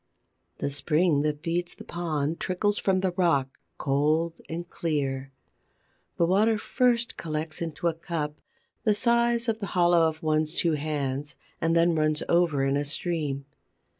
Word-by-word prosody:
The 140 - -2
spring 150 +2 +2
that 150 0 -2
feeds 170 +1 -1
the - - -11
pond 160 -2 -2
trickles 205 +3 0
from 190 -1 +1
the 190 -1 +1
rock, 165 -7 +1 0.2
cold 155 +4 +1
and 170 +2 -4
clear. 135 -6 -2 0.9
The 170 - +4
water 210 +5 +3
first 240 +2 +1
collects 155 0 -3
into 165 0 -4
a 170 - +2
cup, 160 -2 -4 0.4
the 215 -2 +3
size 235 +1 +2
of 225 -1 0
the 200 - -4
hollow 175 -1 +5
of 155 0 -9
one's 155 +1 +1
two 170 - +1
hands, 145 -2 -2 0.3
and 165 0 +2
then 170 +1 +4
runs 155 -1 +1
over 170 -5 +3
in 135 +1 +2
a 145 - 0
stream. 145 -2 -2
165 Hz, 155 wpm, -27 LUFS, 150-175 Hz, 0.9 s, hollow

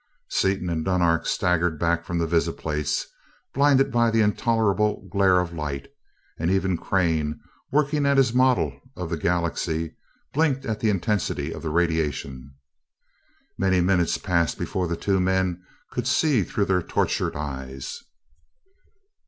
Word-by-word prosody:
Seaton 95 -1 0
and 80 -2 -1
Dunark 85 -3 +1
staggered 90 -3 +1
back 85 +1 +1
from 85 0 -3
the 85 - +1
visiplates, 75 -2 -1 0.5
blinded 140 -1 +4
by 115 0 +3
the 115 0 +2
intolerable 105 -1 +1
glare 95 -2 +4
of 90 -1 -3
light, 75 - -4 0.5
and 80 +1 0
even 95 -1 +1
Crane, 80 -4 0 0.3
working 145 0 +2
at 140 0 +3
his 130 -3 +4
model 130 0 +2 0.2
of 90 -2 -5
the - - +1
galaxy, 85 -1 -1 0.4
blinked 140 -3 +1
at 110 -1 -2
the 110 - +1
intensity 100 0 -1
of - - -8
the 80 - -3
radiation. 75 -5 -1 1.1
Many 95 -1 +3
minutes 90 -1 +2
passed 85 -4 0
before 90 -1 -2
the 85 0 -2
two 95 +1 +1
men 95 -1 0 0.3
could 125 0 -2
see 140 -3 +3
through 100 +3 -1
their 95 -2 +2
tortured - - -1
eyes. 65 -2 -6
90 Hz, 140 wpm, -24 LUFS, 80-105 Hz, 1.1 s, blinded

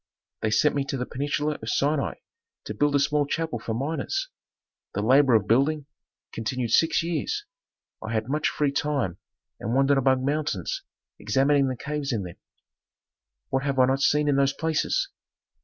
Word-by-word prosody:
They 110 - +1
sent 145 +7 +3
me 140 - 0
to 140 - -3
the 125 - -2
peninsula 145 +3 -2
of 110 - -5
Sinai 140 +2 +1 0.5
to - - -5
build 145 +6 +1
a - - +4
small 145 +1 +1
chapel 160 -4 -2
for 110 0 -4
miners. 160 - -2 0.7
The 105 - -1
labor 130 +1 +5
of 105 -4 +3
building 140 +5 +2 0.5
continued 115 +1 -2
six 165 +6 +3
years. 175 - -2 0.6
I 110 - -5
had 110 -1 -1
much 150 +3 0
free 145 -2 0
time 140 - -1 0.4
and 115 +3 -2
wandered 135 +1 +4
among 130 0 +2
mountains, 145 - -1 0.4
examining 135 +5 +2
the 130 -1 -3
caves 150 +1 -3
in 110 -5 -1
them. 90 -2 -9 1.1
"What 135 - 0
have 140 -1 -2
I 130 - +6
not 135 +1 +1
seen 150 +1 +3
in 140 -1 +3
those 140 0 +3
places! 160 - 0
140 Hz, 170 wpm, -26 LUFS, 125-150 Hz, 1.1 s, I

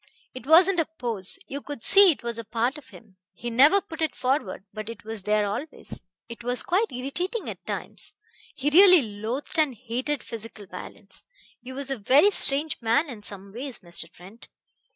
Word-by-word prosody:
It 255 0 -10
wasn't 350 +4 +6
a 325 - +2
pose; 225 - -3
you 280 +1 -5
could 290 -5 -8
see 395 -2 +8
it 285 - -6
was 235 -1 -3
a - - -4
part 235 +6 -1
of 265 -3 -19
him. 205 -7 -16 0.2
He 240 +4 -5
never 285 +12 +6
put 330 -5 -9
it 315 - 0
forward, 255 -8 -1
but 215 0 -6
it 230 - -9
was 220 -1 -6
there 210 +1 +1
always. 245 +10 -6 0.3
It 235 0 -10
was 245 +1 -1
quite 395 +6 +1
irritating 350 - -3
at - - -7
times.... - - -4 0.4
He 290 +2 -1
really 365 -1 +8
loathed 230 - -4
and 295 -5 +2
hated 255 +5 -3
physical 225 -2 -8
violence. - - -10 0.4
He 255 - -9
was 275 +1 -4
a 265 - -2
very 280 - +5
strange 290 -5 0
man 235 +8 +2
in 230 -5 -8
some 200 -1 -5
ways, 255 +1 -7
Mr. 170 -2 -3
Trent. 190 +7 -15
255 Hz, 190 wpm, -25 LUFS, 220-300 Hz, 0.4 s, see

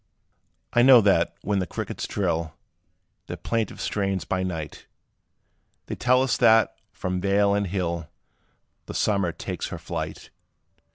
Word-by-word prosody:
I 120 - +5
know 130 0 +9
that, 85 -4 +2
when 100 -1 0
the 90 - -2
crickets - - -5
trill 85 -5 -2 0.7
Their - - -5
plaintive 115 -2 -2
strains 95 -2 -1
by 95 - -1
night, 80 -5 -5 1.0
They - - -5
tell 125 +1 +3
us 135 - +1
that, 115 -2 +4 0.2
from 90 0 -3
vale 100 +1 +3
and 100 -1 0
hill, 85 -4 -3 0.8
The - - -7
summer 100 -5 +1
takes 80 - -5
her - - -6
flight. - - -6
100 Hz, 135 wpm, -25 LUFS, 85-105 Hz, 1.0 s, know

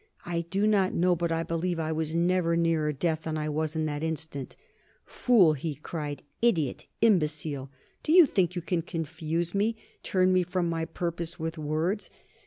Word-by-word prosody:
I 170 -1 -1
do 195 +3 +1
not 200 -3 +2
know, 180 +1 +3
but 170 0 -1
I 165 0 0
believe 165 +1 -2
I 160 0 -1
was 160 0 -2
never 170 0 +2
nearer 165 -2 +2
death 160 +2 -1
than 160 -1 -3
I 155 0 -2
was 155 +1 -2
at 160 0 0
that 145 -1 -3
instant. 160 -4 -4 0.5
"Fool!" 205 -11 +4
he 150 +1 -4
cried. 150 0 -5 0.2
"Idiot! 170 - +1
Imbecile! 150 -9 +1 0.3
Do 310 - -1
you 350 0 +9
think 180 - +1
you 175 - -3
can 175 -1 0
confuse 165 0 -3
me, 210 +3 +1 0.3
turn 185 -1 +2
me 185 - +4
from 180 0 -1
my 165 -1 -1
purpose, 170 0 -4
with 160 0 -4
words? 160 +7 -1
165 Hz, 180 wpm, -28 LUFS, 155-180 Hz, 0.5 s, you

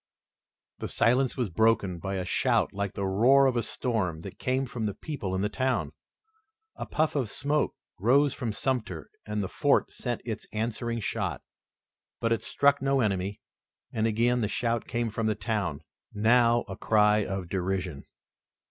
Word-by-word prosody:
The - - -3
silence 125 +2 +2
was 120 -7 -1
broken 100 -2 +2
by 95 +3 -3
a 90 -1 -2
shout - - +1
like 100 0 -3
the 100 - -2
roar 120 +9 +5
of 130 -2 +2
a 120 - +2
storm, 95 -11 -2
that 95 +1 -9
came 130 +1 0
from 120 -3 -4
the 105 - -2
people 105 - -4
in 95 - -1
the 105 - +2
town. 130 +4 -1 0.8
A - - -6
puff 155 0 0
of 130 -7 0
smoke 145 +4 0 0.2
rose 135 +7 +4
from 115 -3 -3
Sumter 110 -7 -2 0.2
and 105 -1 -1
the - - -2
fort - - +2
sent - - -4
its - - -5
answering 115 +1 -2
shot, - - -2 0.8
but 115 - 0
it 115 - -1
struck 140 +3 +2
no 135 0 +2
enemy 100 -3 -1 0.5
and 110 0 +1
again 120 +2 +2
the 105 - +1
shout 115 +2 -1
came 120 -2 -1
from 110 +1 -1
the 110 - +1
town, 100 -11 -2 0.3
now 115 +2 +4
a - - -6
cry 105 -1 +3
of 95 -2 -4
derision. 90 -4 -2
110 Hz, 170 wpm, -28 LUFS, 100-125 Hz, 0.8 s, roar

